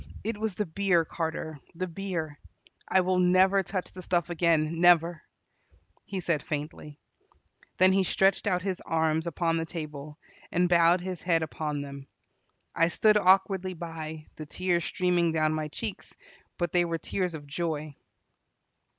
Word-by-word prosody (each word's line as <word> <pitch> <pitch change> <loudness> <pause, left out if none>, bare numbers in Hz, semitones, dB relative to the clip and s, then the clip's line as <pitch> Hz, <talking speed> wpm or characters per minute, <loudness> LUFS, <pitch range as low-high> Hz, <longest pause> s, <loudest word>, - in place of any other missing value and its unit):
It 220 -1 -3
was 220 -3 -2
the 210 - -1
beer, 175 -1 +1
Carter, 160 -2 -4 0.2
the 185 +2 -3
beer. 165 -4 -4 0.5
I 190 - +4
will 185 0 +1
never 185 +2 +4
touch 190 -1 -4
the 185 - -9
stuff 175 -1 -1
again, 165 -1 +1
never," 170 -1 +4 0.8
he 195 -2 -4
said 165 -4 0
faintly. 150 0 -6 0.8
Then 185 +1 +6
he 195 0 +3
stretched 195 +2 +2
out 180 -2 +1
his 190 -2 -3
arms 160 0 +1
upon 165 0 0
the 165 - -2
table, 150 -2 -7 0.3
and 180 0 +2
bowed 175 0 +4
his 185 -1 -5
head 165 -3 +2
upon 150 -2 -3
them. 140 -1 -9 0.7
I 165 - +3
stood 215 +5 +3
awkwardly 190 -1 +3
by, 160 -2 -7
the 155 - -7
tears 175 +1 0
streaming 175 -3 +1
down 155 -1 +2
my 155 -1 -2
cheeks, 205 +7 -6 0.4
but 175 -3 -1
they 175 -1 +3
were 170 -1 -2
tears 180 +1 -3
of 145 -2 -9
joy. 155 -1 -4
170 Hz, 155 wpm, -28 LUFS, 155-185 Hz, 0.8 s, Then